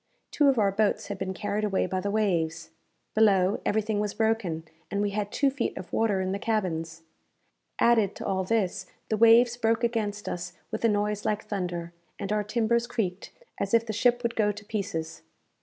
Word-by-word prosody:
Two 290 - +3
of 265 - +2
our 200 -3 +3
boats 210 +1 0
had 200 -2 -4
been 190 0 -2
carried 205 +2 -2
away 200 -2 +1
by 185 +1 -2
the 200 +2 -2
waves. 170 -6 0 0.4
Below, 200 -3 +3
everything 215 0 0
was 210 -1 -2
broken, 220 -8 0 0.3
and 200 - -2
we 205 0 0
had 205 0 -2
two 280 -1 +2
feet 265 -3 -2
of 180 -1 -8
water 210 -4 +2
in 185 0 -1
the 200 - -2
cabins. 165 -7 -2 0.7
Added 225 -4 +3
to - - -7
all 190 -1 0
this, 185 -3 -1 0.2
the 215 - +1
waves 230 +2 +6
broke 230 0 +1
against 215 -3 -1
us 175 0 -4 0.2
with - - -4
a 230 - +5
noise 210 0 0
like 210 0 -1
thunder, 175 -4 -4 0.2
and 200 - -4
our 210 0 +1
timbers 235 +2 +1
creaked 200 -6 -3 0.3
as - - +1
if 230 0 +3
the 220 - -3
ship 245 +3 +2
would 235 0 -1
go 210 -2 +2
to 210 +1 -10
pieces. 195 -7 -4
210 Hz, 195 wpm, -27 LUFS, 190-225 Hz, 0.7 s, waves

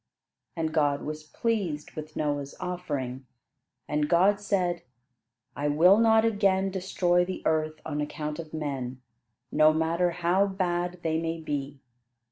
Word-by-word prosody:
And 160 -2 -2
God 145 -3 +2
was 155 0 -5
pleased 180 -5 -2
with 155 0 -8
Noah's 145 -2 -2
offering, 140 -8 -4 0.6
and 150 0 0
God 190 +4 +4
said: 180 -4 0 0.7
"I 145 - -1
will 175 +8 +6
not 225 -1 +5
again 195 -3 +2
destroy 180 -2 +1
the 185 +1 -5
earth 155 0 0
on 150 -1 -2
account 150 +1 -4
of 160 -2 -7
men, 135 -5 -4 0.5
no 155 +1 +6
matter 165 +3 +1
how 180 +3 +2
bad 180 -2 -2
they 160 0 0
may 165 0 -2
be. 145 -3 -4
165 Hz, 135 wpm, -27 LUFS, 150-180 Hz, 0.7 s, will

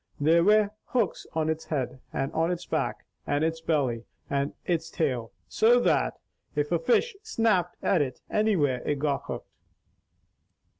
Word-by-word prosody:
There 165 +3 +4
were 210 +1 +4
hooks 235 -7 -1
on 160 -1 0
its 160 0 -2
head, 130 -4 -3
and 135 +1 -2
on 165 +1 +1
its 175 -1 -3
back, - - -2 0.2
and 145 +2 +1
its 165 0 -1
belly, 135 -8 0 0.3
and 140 0 0
its 165 -2 -1
tail, 125 -9 -1 0.2
so's 240 +2 +4
that - - +2 0.4
if 145 +1 0
a 170 - +3
fish 325 - +2
snapped 225 - +1
at 180 - +3
it 130 -3 -2
anywhere 165 - +2
it 145 - 0
got 140 -1 -1
hooked." - - -6
160 Hz, 155 wpm, -27 LUFS, 140-190 Hz, 0.4 s, There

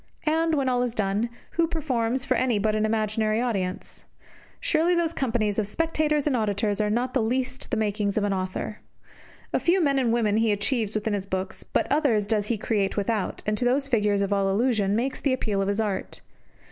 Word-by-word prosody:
And, 320 +1 +2
when 275 -2 0
all 250 -1 +2
is 245 -1 -2
done, 205 +3 0 0.2
who 335 -1 +1
performs 260 -6 -1
for 260 - +2
any 250 -4 +1
but 215 +1 +1
an 215 0 +1
imaginary 215 0 0
audience? 195 -7 -3 0.5
Surely 350 -7 +2
those 335 -1 +1
companies 225 -7 0
of 210 - 0
spectators 305 +2 0
and 290 -4 +2
of 235 - +1
auditors 205 0 0
are 210 - +1
not 245 +4 0
the 260 - +2
least 255 +3 -1
of - - -19
the - - -1
makings 210 -1 0
of 210 - +2
an 205 -1 +1
author. 185 +2 -3 0.7
A - - +3
few 355 +3 +3
men 280 -5 +2
and 245 -3 +1
women 220 -3 +2
he 225 -1 +3
achieves 215 +1 -1
within 215 0 -1
his 200 -1 -3
books; 190 0 -3
but - - -1
others 275 -9 +2
does 210 -1 0
he 235 - 0
create 205 -2 -1
without, 205 -1 -1
and 210 - +1
to 245 - 0
those 270 +3 +2
figures 210 -5 +2
of 200 +1 0
all 195 -1 +1
illusion 205 -1 +1
makes 255 +4 -1
the 275 - +2
appeal 210 -6 -1
of 195 - 0
his 200 +2 0
art. 205 -4 -2
220 Hz, 215 wpm, -25 LUFS, 205-260 Hz, 0.7 s, A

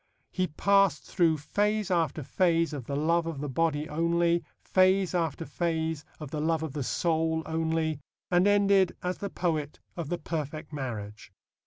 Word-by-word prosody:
He 185 -1 0
passed 195 0 +3
through 165 -4 +2
phase 210 +6 0
after 165 -3 +1
phase 165 +1 +1
of 135 -5 -5
the 140 - -3
love 165 +3 +1
of 160 -4 -4
the 145 - -3
body 150 +2 0
only, 170 +2 +1 0.2
phase 185 0 +3
after 165 -2 -1
phase 160 -3 -2
of 150 -3 -8
the 150 - -2
love 160 0 +1
of 155 -4 -4
the 145 - -3
soul 160 +3 0
only, 160 -1 -1 0.3
and 180 +2 +4
ended 200 -2 +4
as 180 0 -2
the 200 - -3
poet 155 -6 -2 0.2
of 170 -4 -5
the 175 - -1
perfect 155 -2 -5
marriage. 110 -8 -6
165 Hz, 165 wpm, -28 LUFS, 150-175 Hz, 0.3 s, and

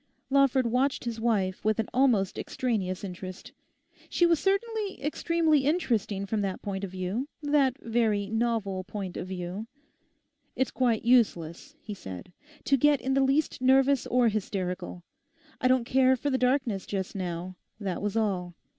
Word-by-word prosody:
Lawford 275 -2 +4
watched 255 +4 +1
his 230 -1 -3
wife 200 -5 0
with 215 0 +2
an 225 - -1
almost 235 -7 +2
extraneous 200 -7 -2
interest. 185 -1 -7 0.6
She 350 - +3
was 335 -2 +3
certainly 410 +1 -1
extremely 315 +1 +1
interesting 235 - 0
from 210 +1 -1
that 195 -2 -2
point 195 -1 -4
of 195 - -3
view, 190 +8 -3 0.2
that 285 -3 +2
very 220 -5 0
novel 220 -4 -1
point 190 -1 -6
of - - -5
view. 185 +3 -5 0.9
'It's 260 - 0
quite 235 -4 +1
useless,' 235 - +2
he 210 - -6
said, 95 - -9 0.3
'to 275 - +3
get 290 +1 +4
in 265 - -1
the 275 - +3
least 270 +1 +1
nervous 265 0 +4
or 245 -1 +3
hysterical. 185 -4 -3 0.6
I 255 - +3
don't 255 -2 +3
care 260 +1 +4
for 285 +3 -2
the 260 - +1
darkness 250 -6 +1
just 190 -2 -3
now. 180 -1 -4 0.2
That 190 -4 -3
was 205 +1 -1
all. 185 -5 -1
225 Hz, 155 wpm, -28 LUFS, 190-265 Hz, 0.9 s, Lawford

